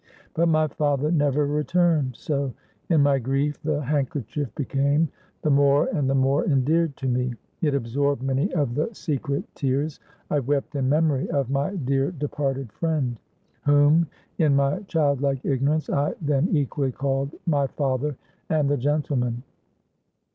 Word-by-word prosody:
But 170 +1 +2
my 155 -1 +3
father 145 0 0
never 145 -2 +2
returned; 150 -2 +1
so, 140 -3 -2 0.3
in 160 -4 +4
my 140 -1 +3
grief, 135 +4 -1
the 150 -1 -1
handkerchief 145 -1 -2
became 140 +3 +1 0.3
the 150 - +2
more 140 0 +4
and 140 -3 0
the 135 - +2
more 135 +2 +2
endeared 150 +1 +1
to 135 - -3
me; 125 -1 0 0.3
it 150 -4 +2
absorbed 140 +1 0
many 135 +7 0
of 145 -7 0
the 150 - -1
secret 140 -4 -2
tears 140 +2 -1 0.3
I 150 - +3
wept 140 +2 -1
in 130 -2 0
memory 150 -2 +2
of 140 -5 -1
my 140 +8 0
dear 135 -2 0
departed 135 - -3
friend, 145 -5 -1 0.5
whom, 145 +3 +5 0.3
in 150 -4 +4
my 140 +4 +2
child 145 -6 +1
like 135 -2 -1
ignorance, 145 +3 +1
I 145 +1 0
then 145 0 +1
equally 140 -3 0
called 135 +2 -2
my 145 -5 +2
father 135 +1 -1 0.3
and 155 -3 +2
the 145 - +2
gentleman. 130 -3 -1
140 Hz, 150 wpm, -24 LUFS, 135-150 Hz, 0.5 s, whom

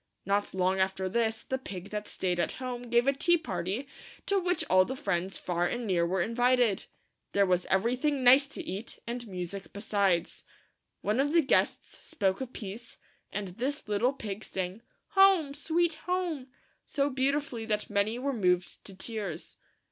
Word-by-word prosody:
Not 200 0 0
long 185 +1 +2
after 190 0 0
this, 220 +2 0
the 265 - -2
pig 200 -6 -8
that 210 0 -4
staid 180 -2 -1
at 170 - 0
home 245 -2 -5
gave 240 +1 +4
a 275 - +4
tea 345 +5 +4
party, 195 - -3 0.4
to 400 -1 +2
which 360 -1 0
all 185 0 +6
the 260 +7 -4
friends 190 -7 -1
far 175 -1 0
and 245 +3 -3
near 175 -4 +2
were 185 0 +1
invited. 245 -2 +2 0.5
There 200 0 +4
was 180 -1 +1
every 225 +6 +2
thing 280 0 0
nice 265 +3 +7
to 325 +4 -7
eat, 215 -6 -5
and 240 0 -5
music 185 0 -6
besides. 200 -4 0 0.6
One 210 +4 0
of 290 +3 +2
the 335 - +6
guests 270 - +1
spoke 190 +2 -1
a 260 - -2
piece, 225 -1 -8 0.3
and 200 -1 -3
this 260 +10 -3
little 210 +6 +2
pig 215 -5 -6
sang 185 +3 -4 0.2
" - - -48
Home! 385 -7 +5
sweet 330 +3 +1
Home!" 355 -7 -1 0.4
so 280 0 0
beautifully 265 -2 0
that 210 -1 -2
many 205 +3 +1
were 275 +2 -1
moved 180 -5 0
to 195 - -10
tears. 200 -4 -5
225 Hz, 175 wpm, -30 LUFS, 190-265 Hz, 0.6 s, nice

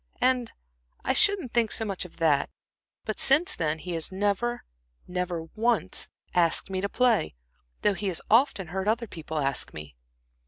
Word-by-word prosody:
And 250 -2 +2 0.5
I 260 - +1
shouldn't 380 - +4
think 235 -2 +2
so 225 - +1
much 195 -3 -3
of 180 - -14
that; 155 -4 +2 0.6
but 215 - -3
since 305 +7 +5
then 155 -2 -1
he 180 +3 -7
has 165 +2 -3
never 205 +5 -1 0.4
never 180 -2 -2
once 235 +2 +1 0.3
asked 175 +2 +1
me 185 -1 -1
to 200 - -1
play, 235 - +2 0.5
though 205 - +4
he 200 +1 -4
has 180 -3 -1
often 225 - +3
heard 190 +3 -3
other 230 +2 +1
people 160 -6 -7
ask 140 -2 -1
me." 75 -4 -9
195 Hz, 165 wpm, -27 LUFS, 165-235 Hz, 0.6 s, since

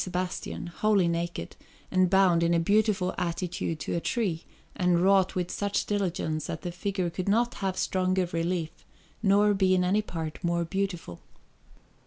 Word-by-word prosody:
Sebastian, 180 0 -4
wholly 195 +1 +2
naked, 170 - -3 0.4
and 185 -1 +3
bound 185 -3 +4
in 170 0 +3
a - - +3
beautiful 200 0 +2
attitude 170 -2 -2
to - - -3
a 170 - +1
tree, 175 -4 -2 0.3
and 180 -1 +2
wrought 190 0 +3
with 180 -1 -2
such 205 0 -1
diligence 175 -6 -1
that - - -5
the 175 - -3
figure 185 -1 -2
could 185 +3 -3
not 235 +4 +2
have 190 -1 -1
stronger 185 -1 +1
relief 165 0 -2 0.4
nor 205 0 +4
be 190 -1 +3
in 180 - +2
any 195 +4 +2
part 165 -5 -6
more 170 0 0
beautiful. 180 - -3
180 Hz, 160 wpm, -28 LUFS, 170-195 Hz, 0.4 s, bound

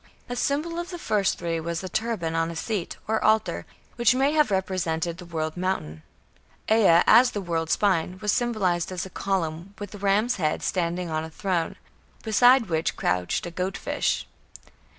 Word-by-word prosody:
A 245 - -3
symbol 305 +6 -1
of 345 - -5
the 355 - -6
first 210 - 0
three 170 -1 -2
was 170 +2 -4
a - - -4
turban 195 -5 -2
on 165 0 0
a 170 - -6
seat, 200 +1 -3
or 220 0 0
altar, 220 0 +1 0.3
which 240 0 +4
may 270 +2 +3
have 300 -3 +3
represented 180 -3 -1
the 175 - -10
"world 160 -2 -3
mountain". 175 - -3 0.7
Ea, 195 -7 +6
as 250 +1 +7
"the - - 0
world 165 -4 -2
spine", 185 -2 +1
was 210 -1 0
symbolized 190 -9 0
as 185 0 -3
a 190 - -10
column, 185 -1 -3
with 205 -1 -8
ram's 210 +5 +2
head, 155 -4 -1
standing 175 -1 -1
on 155 0 -1
a 160 - -6
throne, 175 -1 -2 0.5
beside 245 +3 +5
which 160 -4 -1
crouched 90 - 0
a 175 - -5
"goat 185 +3 -3
fish". - - -1
185 Hz, 175 wpm, -25 LUFS, 165-220 Hz, 0.7 s, as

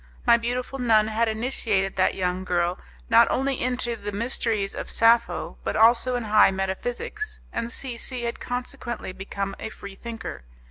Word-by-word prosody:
My 235 -2 +7
beautiful 245 +3 -2
nun 220 -3 +4
had 225 +1 +1
initiated 220 -4 -1
that 185 - +2
young 180 0 -1
girl, 175 -1 0 0.3
not - - +6
only 270 0 0
into 245 -1 0
the 205 -2 -6
mysteries 215 -1 -1
of - - -6
Sappho, 230 +1 +2
but - - -2
also 235 +3 +5
in 245 - -1
high 215 -1 +6
metaphysics, 195 - -3
and 230 0 -3
C 255 -2 -2
C 250 +1 -1
had 235 0 -3
consequently 245 -3 -4
become 195 +1 -4
a 220 - -4
Freethinker. 200 - -8
230 Hz, 155 wpm, -25 LUFS, 195-245 Hz, 0.3 s, My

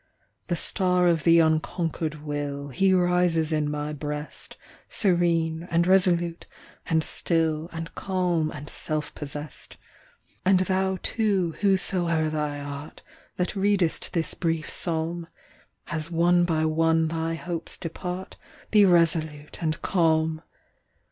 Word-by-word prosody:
The 175 - 0
star 180 +1 +2
of 165 -4 +2
the 165 0 +6
unconquered 160 -1 0
will, 145 -1 -4
He 190 +8 +2
rises 180 -3 +2
in 150 -1 0
my 150 0 -3
breast, 150 +1 -5 0.3
Serene, 170 -3 +1
and 170 0 +2
resolute, 175 -2 +2 0.4
and 160 -1 +2
still, 160 -1 0
And 165 0 -6
calm, 180 -4 0
and 150 -1 -8
self 155 0 -3
possessed. 145 +1 -6 0.7
And 185 0 +4
thou, 190 0 0
too, 200 -7 +1
whosoe'er 175 -5 +2
thou 150 -2 -2
art, 145 +1 -8 0.3
That 180 +3 -1
readest 195 -5 +1
this 165 -3 +1
brief 165 -3 -2
psalm, 165 0 -1 0.6
As 160 -1 -3
one 175 +1 +3
by 160 -2 +1
one 160 +1 +2
thy 165 0 -2
hopes 170 0 -4
depart, 180 +2 -6 0.3
Be 210 -2 +6
resolute 160 -4 +1
and 155 -2 -1
calm. 160 -3 +2
165 Hz, 120 wpm, -26 LUFS, 155-180 Hz, 0.7 s, the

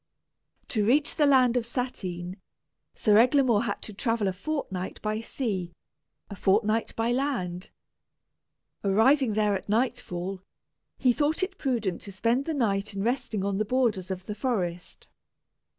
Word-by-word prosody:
To 215 -3 +1
reach 285 +8 +2
the 295 - +3
land 255 -3 +5
of 245 - +2
Satyn, 190 -7 -4 0.6
Sir 210 -2 +4
Eglamour 245 -3 +4
had 205 - -3
to 215 - -6
travel 225 0 0
a 190 - 0
fortnight 195 -5 -4
by 215 0 -1
sea, 195 -8 -3 0.5
a 200 - -8
fortnight 215 +4 +1
by 230 +1 0
land. 240 -10 -2 1.1
Arriving 225 +5 +4
there 210 -1 +2
at 195 +1 -4
nightfall, 200 -6 -1 0.6
he 255 -2 +3
thought 305 +6 +1
it 390 +1 -4
prudent 230 - -1
to 200 - -8
spend 235 +7 0
the 320 - -2
night 205 -5 0
in 195 - -2
resting 235 -4 -1
on 200 0 -1
the - - +2
borders 215 -5 0
of 185 -1 -5
the 210 - -4
forest. 190 -7 -3
220 Hz, 150 wpm, -27 LUFS, 195-255 Hz, 1.1 s, land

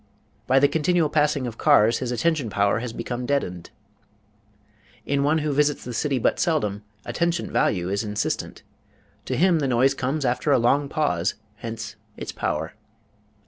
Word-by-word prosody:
By 130 - +4
the 140 +1 +6
continual 160 +1 +1
passing 150 -3 +1
of 115 -2 -6
cars 110 +2 +4
his 125 -2 -3
attention 150 -1 0
power 100 +1 +1
has 120 0 -5
become 120 +2 -5
deadened. 90 -12 -2 1.4
In 140 0 0
one 150 +3 +2
who 150 - 0
visits 145 +1 +1
the 125 - -6
city 135 +4 0
but 115 - +1
seldom, 105 - 0 0.2
attention 170 0 -1
value 90 -3 +1
is 100 +3 -1
insistent. 105 -1 -3 0.6
To 130 - -2
him 175 0 +4
the 140 - 0
noise 130 +2 +3
comes 135 +2 -2
after 125 +4 0
a - - +5
long 140 +4 +2
pause; 120 - 0 0.2
hence 110 -1 -7 0.2
its - - -5
power. - - -3
130 Hz, 160 wpm, -24 LUFS, 115-150 Hz, 1.4 s, the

